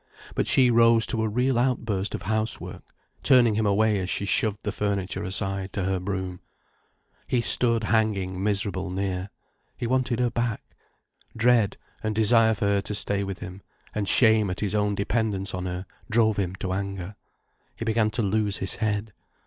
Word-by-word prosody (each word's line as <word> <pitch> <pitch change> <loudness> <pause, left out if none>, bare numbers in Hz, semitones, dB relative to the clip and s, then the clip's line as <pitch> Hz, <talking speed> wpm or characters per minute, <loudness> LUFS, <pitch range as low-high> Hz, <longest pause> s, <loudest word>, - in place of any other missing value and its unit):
But - - -1
she 125 -2 +4
rose 115 -1 +5
to 110 - -1
a 110 - 0
real 125 +3 +1
outburst 115 -6 -1
of - - -7
house 110 +1 -1
work, - - -9 0.4
turning 125 -5 +5
him 110 0 0
away 105 +1 +2
as 90 -1 -3
she 100 - -2
shoved 105 0 0
the 105 - -2
furniture 100 -2 -2
aside 95 0 -2
to 95 - -2
her 95 0 0
broom. 95 -1 -4 0.9
He 125 - +1
stood 115 -1 +3
hanging 105 -4 0
miserable 100 -2 -1
near. 95 0 -3 0.5
He 125 - -4
wanted 130 0 0
her 120 -1 +1
back. 120 -2 -2 0.7
Dread, 115 -3 +3 0.2
and 110 -1 -2
desire 110 +1 +4
for 100 - -2
her 100 0 +2
to 105 - -5
stay 100 -1 -1
with 95 -2 -6
him, 90 +2 -8 0.3
and 105 -2 -1
shame 110 -4 +5
at 90 - -4
his 105 -1 -1
own 105 -1 +1
dependence 100 -2 -1
on 90 0 -3
her 90 +1 -5 0.2
drove 110 -2 +2
him 95 -2 -2
to 95 -1 -4
anger. 100 0 -4 0.6
He 115 - -6
began 110 -1 +2
to 110 +2 -2
lose 105 0 +1
his 95 - -1
head. 105 0 -2
105 Hz, 180 wpm, -25 LUFS, 95-115 Hz, 0.9 s, rose